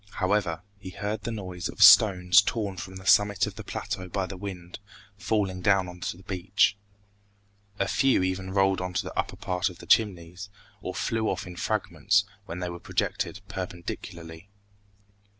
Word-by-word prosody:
However 95 -3 0 0.2
he 95 - -8
heard 105 +3 -4
the 115 - -4
noise 90 -5 -5
of 105 - +2
stones 95 -3 +8
torn 100 -2 -3
from 95 +1 -7
the 95 0 -10
summit 105 -2 +4
of - - -6
the - - -9
plateau 90 - -5
by 95 0 -1
the 95 - -7
wind, 90 -2 -8 0.4
falling 100 -2 -1
down 95 -1 +3
on 90 0 -10
to 90 - -4
the 95 - -16
beach. 95 +2 +1 1.0
A 100 - 0
few 135 -8 +3
even 95 0 -2
rolled 95 0 +2
on 90 0 -4
to - - 0
the - - -8
upper - - -2
part 90 +2 -1
of 90 - -12
the - - -12
Chimneys, 95 -2 +1 0.3
or - - -5
flew 110 -1 -1
off - - -3
in 90 -1 -9
fragments 100 +3 +1 0.2
when 85 - -6
they 90 - -2
were 85 - -8
projected 95 +3 -2
perpendicularly. 85 -2 -7
95 Hz, 175 wpm, -27 LUFS, 90-100 Hz, 1.0 s, stones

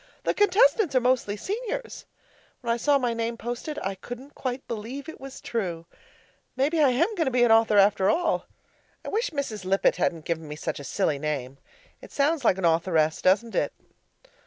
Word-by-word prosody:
The - - +1
contestants 410 - +3
are - - +6
mostly 245 -4 +1
Seniors. 475 - -5 0.5
When 235 -2 0
I - - -1
saw 285 +4 +3
my 245 -3 0
name 230 0 -2
posted, 240 +7 -5
I 195 - -1
couldn't 245 +8 -9
quite 255 0 -4
believe 235 +6 -6
it 320 - -9
was 270 0 -9
true. 175 -8 -3 0.7
Maybe 290 +5 +1
I 285 - +6
am 255 - +1
going 340 -6 0
to - - +1
be 250 -1 +2
an 240 - +4
author 225 -1 +5
after 195 -1 +4
all. 330 0 +1 0.6
I - - -4
wish 460 +4 0
Mrs. 275 - -4
Lippett 190 +1 +2
hadn't 160 -2 -1
given 165 -2 -3
me 150 - -6
such 150 - -4
a - - -8
silly 155 -2 -1
name 140 -3 -4 0.4
it - - -13
sounds 290 +1 +1
like 195 -5 +3
an 190 - -1
author 165 +1 +2
ess, 155 0 +2
doesn't 205 +5 +2
it? - - 0
235 Hz, 195 wpm, -26 LUFS, 190-285 Hz, 0.7 s, are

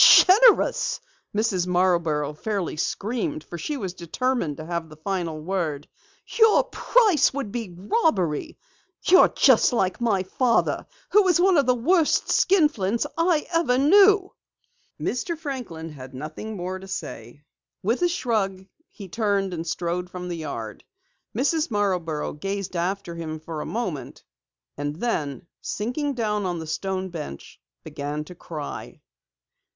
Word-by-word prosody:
"Generous!" 450 +5 +6 0.4
Mrs. 195 -5 +1
Marborough 170 -5 +1
fairly 195 +2 -3
screamed 250 - -2
for 175 - -8
she 295 - -3
was 190 -7 -4
determined 175 - -2
to 155 - -7
have 170 -1 -3
the 155 - -12
final 170 -1 -3
word. 155 -4 -3 0.5
"Your 445 -1 +6
price 425 - +3
would 270 -8 -3
be 220 -7 -5
robbery! 190 - 0 0.5
You're 370 - +7
just - - +4
like 190 -6 +1
your 215 -6 +1
father, 235 +5 +1 0.2
who 420 - +7
was 365 -3 +3
one 375 +1 +4
of 280 -4 +3
the 250 - +4
worst 320 +6 +2
skinflints 290 - +2
I 330 -2 +2
ever 330 -7 +2
knew!" 390 +6 +5 0.7
Mr. 330 +7 -2
Franklin 250 - -6
had 130 -3 -10
nothing 155 +10 -6
more 185 +1 -4
to 190 - -11
say. 120 - -7 0.4
With 230 - 0
a 355 - +4
shrug, 210 - -1 0.2
he 200 -3 -10
turned 200 -1 0
and 165 0 -5
strode 175 +2 -2
from 180 0 -6
the 170 - -3
yard. 115 -9 -6 0.5
Mrs. 305 +5 +1
Marborough 180 -8 -1
gazed 195 +4 -4
after 180 +1 -2
him 160 -2 -5
for 160 -1 -6
a - - -5
moment, 180 - -4 0.5
and 145 +1 -3
then 165 - -2 0.2
sinking 270 +6 -2
down 210 -4 -1
on 175 -1 -2
the 160 - -5
stone 190 +4 -3
bench, 150 - -8 0.2
began 145 +1 -4
to 180 - -11
cry. 155 -4 -7
190 Hz, 140 wpm, -24 LUFS, 165-255 Hz, 0.7 s, You're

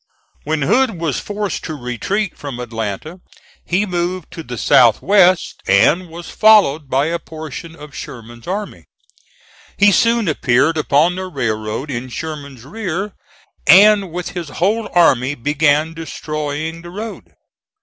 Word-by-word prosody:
When 155 -1 -1
Hood 250 - +2
was 160 -5 -1
forced 205 -2 -4
to 155 - -5
retreat 150 - -3
from 140 -4 -7
Atlanta 115 - -5 0.4
he 185 +4 0
moved 180 -2 -3
to 165 -1 -7
the 125 -5 -7
south 120 0 +5
west 185 -3 +3
and 175 +2 +3
was 170 +1 -9
followed 185 -10 +4
by 135 +2 +2
a 170 +2 -1
portion 160 +1 -9
of 150 -2 -12
Sherman's 120 0 -10
army. 200 +3 -5 0.9
He 205 0 +5
soon 230 0 +2
appeared 140 +1 +2
upon 155 +2 +2
the 185 0 -4
railroad 115 -2 -3
in 125 0 -4
Sherman's 140 -3 -7
rear, 195 +3 -4 0.5
and 195 +3 +6
with 180 +1 -4
his 175 -4 -6
whole 205 - -1
army 145 -6 +3
began 150 +3 +1
destroying 155 0 -5
the 175 - -10
road. 215 +5 -8
160 Hz, 140 wpm, -18 LUFS, 140-185 Hz, 0.9 s, and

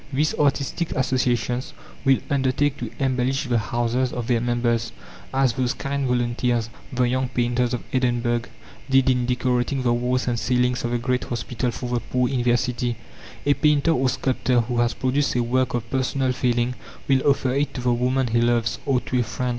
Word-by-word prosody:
These 145 +3 +1
artistic 145 +3 0
associations 125 -1 0 0.3
will 135 -1 +5
undertake 140 0 +1
to - - -4
embellish 135 0 0
the 120 -4 +1
houses 120 +4 0
of 120 -2 -4
their 120 -1 +1
members, 120 -1 0 0.4
as 135 -2 +2
those 125 +1 -1
kind 140 0 -2
volunteers, 120 -1 0 0.2
the 125 -1 +1
young 130 +1 0
painters 120 0 0
of - - -6
Edinburgh, 120 -2 +1 0.5
did 135 0 +4
in 125 -1 0
decorating 125 +1 0
the 120 -1 +2
walls 125 +2 0
and 120 -1 0
ceilings 125 +1 +1
of 120 - -1
the 120 - 0
great 125 +1 -1
hospital 125 +1 -2
for 120 +1 -5
the 120 0 0
poor 125 +2 0
in 130 -2 -1
their 120 0 +3
city. 120 0 -2 0.5
A 145 - +5
painter 150 +2 +3
or 130 -4 +2
sculptor 130 -1 +1
who 120 +1 -3
has 120 0 +1
produced 135 +2 0
a 120 - +2
work 125 +1 0
of 120 -1 -3
personal 130 0 0
feeling 120 -1 0 0.3
will 135 -1 +3
offer 135 -2 +2
it 140 +2 -1
to 125 - -3
the 125 0 +2
woman 125 +2 +1
he 115 0 +1
loves, 120 -1 +1
or 130 -3 +2
to 125 - -1
a - - +3
friend. 125 +2 -3
125 Hz, 190 wpm, -23 LUFS, 120-130 Hz, 0.5 s, will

